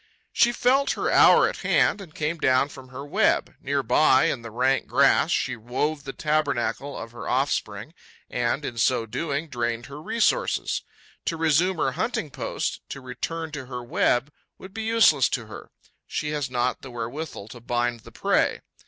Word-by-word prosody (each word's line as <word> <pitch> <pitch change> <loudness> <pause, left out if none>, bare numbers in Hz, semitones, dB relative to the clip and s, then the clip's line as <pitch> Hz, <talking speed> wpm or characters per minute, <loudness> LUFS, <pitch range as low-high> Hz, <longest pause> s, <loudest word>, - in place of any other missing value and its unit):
She 240 - +4
felt 260 +3 +2
her - - -1
hour - - +7
at - - -4
hand 205 - +2
and 170 -5 -12
came 155 +2 -2
down 130 0 +3
from 130 -2 -12
her 130 +2 -8
web. 145 - +1
Near 140 0 -1
by, 130 +2 +4
in 125 - -4
the 115 - -8
rank 130 +4 +1
grass, - - +4
she - - 0
wove 140 +6 -2
the 135 - -4
tabernacle 145 -2 -1
of 115 0 -7
her 120 - -7
offspring 125 -2 -1 0.3
and, 125 +4 -1
in 115 -2 -5
so 115 0 +2
doing, 145 +6 -3
drained 120 -3 -2
her 145 +2 -9
resources. 230 - 0 0.4
To 165 - -1
resume 165 +3 +2
her 135 - +1
hunting 155 - -2
post, - - -3
to - - -6
return 160 +5 -5
to 145 -4 -7
her 125 -1 -6
web 120 +3 +1 0.3
would 190 0 -12
be 225 - -4
useless 220 - +4
to 120 -4 -2
her: 110 - -10 0.4
she 150 - -3
has 145 -3 -2
not 125 0 -1
the 135 - -9
wherewithal 120 -1 -6
to 120 - -10
bind 120 0 -1
the - - -15
prey. - - +1
135 Hz, 180 wpm, -25 LUFS, 120-155 Hz, 0.4 s, hour